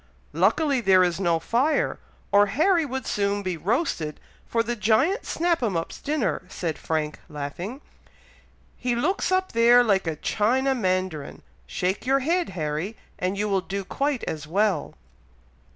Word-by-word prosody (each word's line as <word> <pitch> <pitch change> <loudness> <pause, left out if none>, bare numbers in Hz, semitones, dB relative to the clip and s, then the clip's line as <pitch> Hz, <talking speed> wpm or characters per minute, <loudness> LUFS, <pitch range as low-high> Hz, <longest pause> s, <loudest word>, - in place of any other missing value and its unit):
"Luckily 245 - +2
there 190 -3 +5
is 175 0 0
no 170 -3 +2
fire, 245 - +1 0.3
or 205 0 +5
Harry 325 - +2
would 265 0 -4
soon 200 0 0
be 185 -2 -2
roasted 170 - -1 0.3
for 230 -1 +1
the 240 +1 -2
Giant 235 - +2
Snap 340 -2 0
'em 210 -8 0
up's 165 - -5
dinner," 290 -5 -1
said 165 -5 -4
Frank, 155 -1 -2
laughing; 165 - -6 1.0
"he 245 -1 -1
looks 365 - 0
up 375 0 +1
there 235 +1 +6
like 195 -6 +1
a 160 - -1
China 255 - +1
Mandarin. 185 - -2 0.2
Shake 185 - -2
your 275 +1 +3
head, 340 +6 +1
Harry, 155 +7 -3 0.2
and 185 +2 -1
you 210 +1 0
will 195 -2 +1
do 195 +1 -4
quite 280 +4 -1
as 150 -1 -4
well!" 200 +4 0
210 Hz, 150 wpm, -25 LUFS, 180-265 Hz, 1.0 s, there